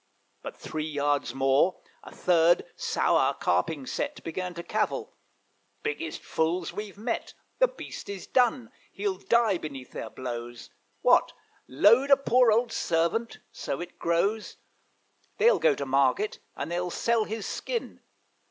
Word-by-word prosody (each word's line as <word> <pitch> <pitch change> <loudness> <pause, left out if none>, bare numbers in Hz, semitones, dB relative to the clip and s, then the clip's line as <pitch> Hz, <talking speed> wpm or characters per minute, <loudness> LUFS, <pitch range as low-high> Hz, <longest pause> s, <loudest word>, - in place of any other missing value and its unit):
But - - -8
three 155 0 -4
yards 145 -1 0
more, 135 +7 +3 0.2
a - - -10
third, 175 -1 +3
sour, - - +2
carping 145 - 0
set, 285 - -4
Began 180 +2 -4
to 170 - -6
cavil, - - -2 0.7
'Biggest 155 +2 -4
fools 165 +2 -1
we've 205 -2 -6
met! 230 +3 -3 0.2
The - - +6
beast - - -9
is 200 -2 -6
done 245 -2 +1 0.2
he'll 195 -2 -2
die 225 -4 +2
beneath 135 -4 -8
their 110 - -6
blows. 120 -1 -7 0.3
What! - - +4 0.3
load 230 - +5
a 275 - +8
poor 250 -3 +4
old 230 +2 +2
servant!' 170 +6 0
so 135 - -4
it 175 0 -8
grows: 195 +6 0 0.8
'They'll 475 +1 +5
go 155 -3 +4
to 140 - -4
market, 135 +9 +1 0.2
and 145 +4 -5
they'll 175 +1 -1
sell 230 +4 +1
his 220 -1 -5
skin.' 480 -2 -4
180 Hz, 140 wpm, -27 LUFS, 150-225 Hz, 0.8 s, a